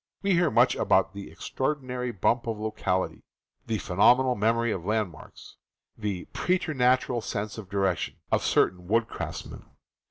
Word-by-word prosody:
We 195 -1 +3
hear 170 -2 +3
much 120 - +4
about 95 +1 +2
the 100 -3 -7
J... - - -13
"extraordinary 125 - -3
bump 115 +4 +1
of 115 -2 -2
locality," 100 -4 -2 0.5
the 110 - 0
"phenomenal 125 +8 +4
memory 115 +1 +1
of 95 -5 -3
landmarks," 105 -5 -4 0.4
the 100 -4 -4
"preternatural 130 -9 +1
sense 105 0 -4
of 100 -4 -10
direction," 95 -3 0 0.2
of - - +2
certain 90 -1 +1
wood 115 +3 +2
craftsmen. - - -6
110 Hz, 145 wpm, -27 LUFS, 100-125 Hz, 0.5 s, much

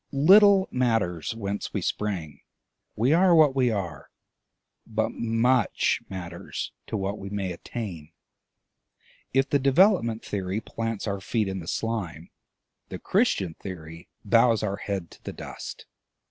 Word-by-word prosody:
Little 195 +6 +6
matters 115 -8 0
whence 100 -2 -4
we - - 0
sprang; 90 -8 -3 0.5
we 125 +7 +2
are 175 +1 +5
what 150 -4 +5
we 130 -2 +3
are. 85 -9 -4 0.8
But - - -1
much 115 0 +1
matters 85 -2 -6 0.2
to 110 - -3
what 100 +1 -3
we 95 - -7
may 100 -2 -3
attain. 85 -4 -7 1.2
If 135 +1 +2
the 145 - +4
Development 135 - +3
Theory 95 0 -2
plants 115 -1 -4
our 100 -2 -3
feet 110 0 -1
in 95 0 -3
the 80 - -9
slime, 90 -9 -3 0.6
the - - -5
Christian 90 -4 +1
Theory 85 -2 -9 0.2
bows 115 +1 +4
our 100 -2 -1
head 95 -5 -4
to - - -17
the - - -6
dust. - - -8
105 Hz, 135 wpm, -26 LUFS, 95-125 Hz, 1.2 s, Little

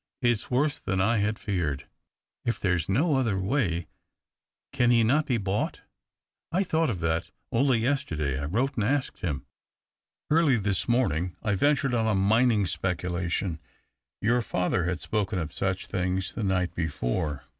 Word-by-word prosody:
" - - -61
It's 120 -3 +1
worse 145 +4 +1
than 95 0 -1
I 110 +5 +3
had 105 +1 0
feared. 85 -9 -2 0.6
Is 120 - 0
there 90 -2 +1
no 145 - +2
other 115 -7 +1
way? 95 - 0 0.9
Can 125 -3 +3
he 115 -1 +5
not 150 +7 +2
be 125 - +2
bought? 100 -1 -2 0.2
" - - -64
" - - -64
I 185 +4 +2
thought 165 -4 +1
of 95 -7 -3
that 80 0 0
— - - -51
only 130 +1 +3
yesterday 85 - -1
I - - -2
wrote 120 - 0
and 110 - -1
asked 135 +4 0
him. 75 -7 -3 0.9
Early 155 -5 +4
this 100 -3 -1
morning 90 - +1
I 105 - +1
ventured 140 +4 +2
on 115 -2 +2
a 110 - +2
mining 110 +2 +3
speculation 90 -1 -2 0.3
— - - -60
your 120 +3 +3
father 90 -3 0
had 90 -1 -1
spoken 100 -3 -1
of 80 -3 -3
such 95 -1 -1
things 95 0 -2
the 110 - -3
night 90 -2 0
before. 75 -2 -2
100 Hz, 175 wpm, -27 LUFS, 90-125 Hz, 0.9 s, he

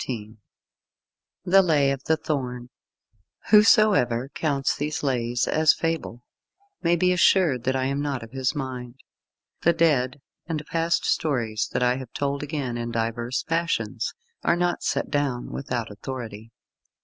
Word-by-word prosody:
XIV 110 -3 -6 1.1
THE 195 +1 +6
LAY 150 -6 +3
OF 135 0 -4
THE 160 - +2
THORN 125 -5 -4 0.8
Whosoever 210 - +5
counts 140 -3 0
these 150 +1 -3
Lays 120 -3 0
as 155 0 +4
fable, 165 -7 -3 0.6
may 170 +1 +3
be 180 +1 +2
assured 170 -8 +3
that 130 - +1
I 130 -1 0
am 140 +1 -1
not 140 -4 -2
of 115 - -11
his 130 +2 -1
mind. 130 -3 -5 0.7
The 170 - +4
dead 145 -5 +2 0.3
and 155 -3 -3
past 165 +1 0
stories 115 -8 0
that - - +1
I 125 +1 +2
have 130 -3 -8
told 140 0 -2
again 140 -5 -3
in 120 0 -3
divers 115 +2 -2
fashions, 165 +1 -1 0.3
are 170 - +3
not 175 0 0
set - - -1
down 140 -4 -1
without 120 -5 -4
authority. 110 0 -7
135 Hz, 145 wpm, -25 LUFS, 120-160 Hz, 1.1 s, THE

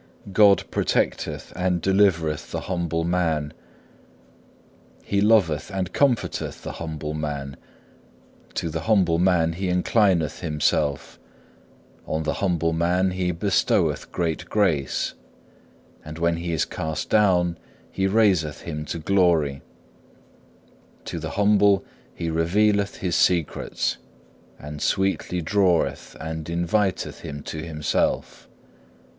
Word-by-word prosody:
God 100 -1 +6
protecteth - - -1
and 90 -1 0
delivereth 85 -5 +2
the - - -3
humble 85 -2 -2
man, 80 -4 0 1.5
He 100 0 0
loveth 100 -8 +3
and 95 -1 -3
comforteth 135 -6 0
the - - -5
humble 80 -2 -5
man, 70 -3 -4 1.0
to 85 - -2
the 80 - -3
humble 90 -6 +3
man 85 -3 +3
He 95 +2 -3
inclineth 90 -4 +2
Himself, 75 -3 -1 0.9
on 80 +1 -1
the 80 - -1
humble 85 -4 +1 0.4
He 90 -1 -1
bestoweth 95 +4 +1
great 80 -3 -2
grace, 80 -11 0 0.9
and 75 +1 -8
when 85 0 +1
he 85 0 -4
is 80 -3 +1
cast 80 +2 -4
down 90 -5 +3 0.3
He 95 0 0
raiseth 95 -8 +2
him 75 -2 -5
to 80 - -4
glory: 80 -5 +2 1.4
to 85 - -4
the 80 0 -5
humble 100 -1 +4 0.3
He 85 -1 -3
revealeth 100 +5 +2
His 90 -2 -2
secrets, 85 -3 +1 0.6
and 75 +1 -8
sweetly 95 -2 0
draweth 90 -1 +1
and 80 0 -5
inviteth 90 +4 -1
him 70 0 -7
to 80 - -6
Himself. 75 -3 -2
85 Hz, 110 wpm, -24 LUFS, 80-95 Hz, 1.5 s, God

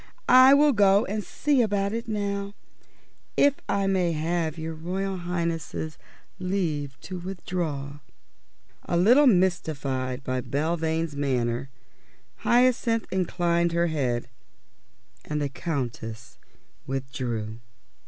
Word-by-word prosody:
I 260 +2 +8
will 295 0 +5
go 200 -1 +4
and 210 +1 -3
see 285 +3 +1
about 200 -2 0
it 230 +1 -4
now, 200 -1 -3 0.8
if 285 -1 +5 0.2
I 200 -1 +1
may 185 -3 +1
have 160 0 -1
your 160 0 -4
Royal 190 +4 -3
Highness's 170 -3 -3 0.4
leave 160 -8 -2
to 185 -1 -6
withdraw?" 165 -6 -4 0.9
A 170 - 0
little 245 +11 +6
mystified 140 - 0
by 130 -1 -2
Belvane's 160 +2 -1
manner, 130 -2 -1 0.7
Hyacinth 240 -2 +2
inclined 170 -2 +1
her 170 0 +2
head, 125 -5 -1 1.0
and 150 0 -3
the 145 -1 -1
Countess 120 -7 -5 0.5
withdrew. 125 -5 -4
170 Hz, 105 wpm, -26 LUFS, 140-195 Hz, 1.0 s, I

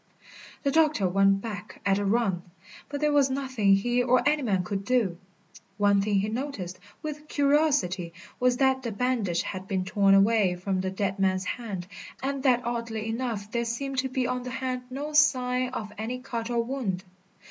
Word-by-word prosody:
The 280 - +2
doctor 305 -9 +3
went 195 +1 +3
back 205 -3 -7
at 195 0 +3
a 205 - -1
run, 200 -4 +1 0.5
but 285 0 -4
there 300 0 +3
was 280 -2 +4
nothing 260 -7 +2
he 240 +5 +1
or 250 +2 +3
any 300 0 +3
man 195 -8 +1
could 200 0 -3
do. 205 -7 +1 0.6
One 205 -1 +4
thing 200 -1 +1
he 205 - -1
noticed, 215 -7 -4 0.2
with 300 0 -6
curiosity, 280 - +2 0.3
was 250 0 +3
that 265 0 +3
the 235 -3 -3
bandage 215 -6 0
had 185 0 -6
been 190 -2 -1
torn 195 0 +4
away 200 -2 +4
from 185 +1 -2
the 190 - -1
dead 195 +1 -2
man's 190 -1 +1
hand 200 -5 -4 0.4
and 275 0 -1
that 250 -3 +3
oddly 230 -2 -3
enough 225 -3 -3
there 235 0 0
seemed 265 +3 -2
to 265 0 -1
be 255 0 -1
on 250 0 -1
the 250 - -6
hand 255 0 -3
no 285 +4 -5
sign 255 -4 +3
of 215 -5 -6
any 230 +3 -3
cut 235 -3 -5
or 235 -1 +1
wound. 230 -8 -3
235 Hz, 185 wpm, -27 LUFS, 195-260 Hz, 0.6 s, was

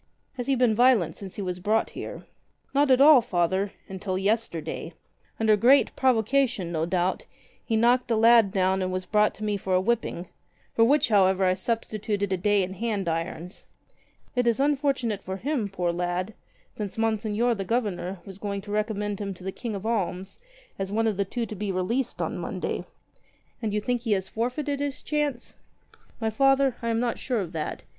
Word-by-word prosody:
"Has 245 -2 -5
he 275 - +3
been 245 -3 +3
violent 220 -9 +4
since 195 -2 -9
he 205 - -4
was 180 -1 -3
brought 215 +4 +1
here?" - - -7 0.5
"Not 285 0 +3
at 260 0 +5
all. 290 -3 +8
Father 190 -2 0
— - - -36
until 190 0 -4
yesterday. 200 -4 -2 0.5
Under 220 -1 +4
great 250 +7 +4
pro 260 -1 +4
vocation, 230 -4 0
no 160 -1 -1
doubt, 180 +1 -1 0.4
he 225 - -1
knocked 245 +2 +3
a 230 - +2
lad 225 -2 +6
down 190 -1 +1
and 185 0 -1
was 185 0 -3
brought 210 0 +2
to 215 - -8
me 210 -1 0
for 190 -1 -1
a - - +4
whipping 200 -4 -1 0.2
— - - -38
for 230 - +4
which 285 +1 +3
however 190 -2 +4
I 185 - +4
substituted 205 -1 -2
a - - +1
day 205 +2 +2
in 185 +1 -4
hand 205 -2 -2
irons. 165 +2 -4 0.7
It 245 -1 +1
is 235 0 +2
unfortunate 275 -7 +1
for 190 +1 -4
him, 250 -2 -2
poor 180 -3 -1
lad, 175 +4 -2 0.4
since 205 -1 -5
Monseigneur 225 +1 +1
the 200 -3 -3
Governor 195 -5 -2
was 195 -1 -10
going 200 -1 -3
to 205 +1 -9
recommend 210 -1 -2
him 200 -2 -4
to 180 - -14
the 190 - -3
King 225 +1 -5
of 200 +1 -6
Alms 190 - -2 0.4
as 195 0 -3
one 225 +2 +1
of 220 -2 +1
the 200 +1 0
two 235 +4 -3
to 215 - -7
be 205 0 -3
released 230 +8 -1
on - - -3
Monday." - - -3 0.8
"And 220 -3 -1
you 210 - 0
think 245 +2 -1
he 225 -3 +1
has 190 -1 -1
forfeited 270 +5 -2
his 285 0 -3
chance?" 295 -5 -2 0.7
"My 220 -1 -1
Father, 270 +1 +3
I 230 - -2
am 225 0 +1
not 240 -1 -1
sure 245 -5 -1
of 175 -4 -5
that. 160 -3 -4
210 Hz, 200 wpm, -26 LUFS, 190-240 Hz, 0.8 s, all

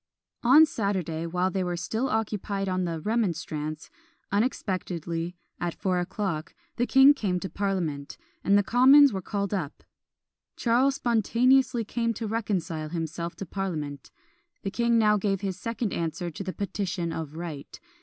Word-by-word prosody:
On 275 +6 +7
Saturday, 185 - -2
while 180 +2 0
they 190 -1 -1
were 175 -1 -2
still 220 +9 -2
occupied 205 -2 -2
on 185 -1 0
the 165 -2 -3
"Remonstrance," 160 -7 -2 0.4
unexpectedly, 180 - -2 0.2
at 175 -1 -2
four 185 -2 0
o'clock, 175 -3 -3 0.2
the 245 - +1
king 270 +2 +7
came 195 -9 -1
to 190 - -6
parliament, 170 -8 -2 0.3
and 200 +1 +4
the 205 - +3
commons 265 +4 +7
were 190 - -2
called 200 +1 -3
up. 165 -7 -4 0.7
Charles 255 +3 +2
spontaneously 240 +1 +2
came 230 +1 -1
to 225 - -4
reconcile 190 -8 -2
himself 170 +1 -4
to 195 - -6
parliament. 155 -7 -4 0.5
The 195 - -2
king 235 +2 +2
now 210 -1 +4
gave 195 -1 -1
his 195 -2 -2
second 230 -2 -3
answer 170 +1 -3
to 180 - -6
the 185 - -3
"Petition 190 -4 -3
of 155 -2 -5
Right." 160 -4 -7
195 Hz, 150 wpm, -27 LUFS, 170-225 Hz, 0.7 s, On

